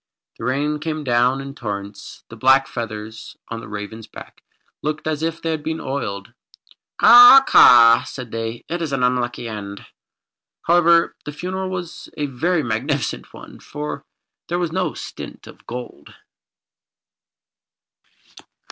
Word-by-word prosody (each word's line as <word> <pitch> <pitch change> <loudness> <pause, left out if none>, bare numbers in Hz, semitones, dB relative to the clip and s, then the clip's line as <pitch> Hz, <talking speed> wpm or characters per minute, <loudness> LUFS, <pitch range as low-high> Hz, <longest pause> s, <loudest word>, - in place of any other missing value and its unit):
The - - -5
rain 145 +4 -1
came 155 0 -4
down 125 +1 +1
in 135 0 -8
torrents. 100 -5 -7
The 115 - -10
black 130 +4 +3
feathers 110 -2 -7
on 115 - -5
the 115 - -10
ravens' 105 +2 -8
backs - - -13 0.4
looked 155 0 -4
as 155 -1 -2
if 165 0 -2
they 165 - -1
had 160 -1 -3
been 160 +1 -4
oiled. 115 -10 -5 0.7
"Caw! 245 +3 +9
caw!" 115 -1 +7
said 125 -4 -9
they. 115 +1 -5
"It 175 - -3
was 165 -4 -4
an 130 -2 -1
unlucky 125 -1 -1
end." 100 -2 -8 0.8
However, 170 0 +3
the 150 - -5
funeral 185 +5 -5
was 180 -2 -7
a 150 - -1
very 155 +5 -1
magnificent 140 +5 -3
one, - - -13
for 150 +1 -7 0.4
there 175 - -2
was 175 -2 -2
no 185 +1 -2
stint - - -9
of - - -16
gold. 125 0 -9
135 Hz, 140 wpm, -20 LUFS, 115-160 Hz, 0.8 s, Caw